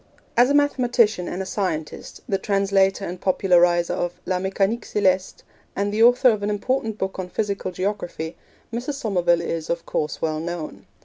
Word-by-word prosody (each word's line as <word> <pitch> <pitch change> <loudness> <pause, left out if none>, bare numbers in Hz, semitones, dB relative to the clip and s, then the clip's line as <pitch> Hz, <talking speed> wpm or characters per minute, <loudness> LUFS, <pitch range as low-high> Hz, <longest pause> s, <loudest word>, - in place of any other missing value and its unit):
As 245 +2 +5
a 285 - +3
mathematician 245 -9 +2
and 190 +2 -3
a - - -8
scientist, 175 -6 -4
the 195 - 0
translator 195 -1 +1
and 180 +1 -6
populariser 175 -2 +3
of 175 0 -3
La 185 -1 0
Mecanique 195 +4 0
Celeste, 190 -2 0 0.3
and 200 +1 -1
the 215 - +1
author 245 +2 +6
of 215 -2 -2
an 205 - -1
important 220 +1 -1
book 190 -1 -3
on 185 -1 -4
physical 200 -1 -2
geography, 180 -4 -3 0.4
Mrs. 250 +5 -3
Somerville 180 -9 +1
is, 165 -1 -4
of 170 0 -2
course, 150 0 -2
well 155 -1 -1
known. 160 - -6
195 Hz, 170 wpm, -23 LUFS, 175-215 Hz, 0.4 s, author